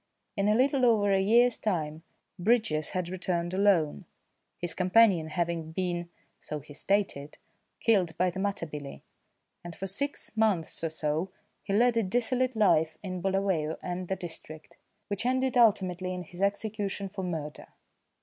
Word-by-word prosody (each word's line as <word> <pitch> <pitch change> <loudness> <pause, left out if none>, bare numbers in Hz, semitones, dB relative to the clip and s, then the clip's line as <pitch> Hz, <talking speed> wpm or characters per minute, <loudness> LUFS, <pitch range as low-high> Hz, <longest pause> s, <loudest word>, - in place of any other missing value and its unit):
In 200 -1 +1
a 210 - +4
little 265 +2 +2
over 210 -4 +4
a 190 - +3
year's 235 +4 +4
time 160 -6 -2 0.4
Bridges 180 -7 +2
had 180 -2 -2
returned 175 -1 -2
alone 185 -4 +2 0.5
his 175 -2 -3
companion 185 -3 +4
having 165 0 -2
been, 175 -1 -2 0.3
so 150 - -5
he 145 +1 -13
stated, 155 -5 -1 0.4
killed 190 -8 +2
by 180 0 +2
the 190 - -6
Matabele, 165 -8 -4 0.6
and 175 -1 -8
for 195 - -5
six 250 +7 -2
months 210 -8 +1
or 165 - 0
so 155 +3 -2 0.3
he 195 - -4
led 235 +3 +4
a - - +4
dissolute 245 +5 0
life 160 -7 +3
in 185 -2 -4
Bulawayo 190 -5 0
and 180 0 -4
the 190 - -1
district, 160 -3 -8 0.3
which 200 0 -3
ended 260 +1 +1
ultimately 185 -6 +2
in 180 - -5
his 175 +2 -10
execution 200 0 -1
for 195 0 -6
murder. 160 -4 -5
185 Hz, 150 wpm, -29 LUFS, 165-210 Hz, 0.6 s, a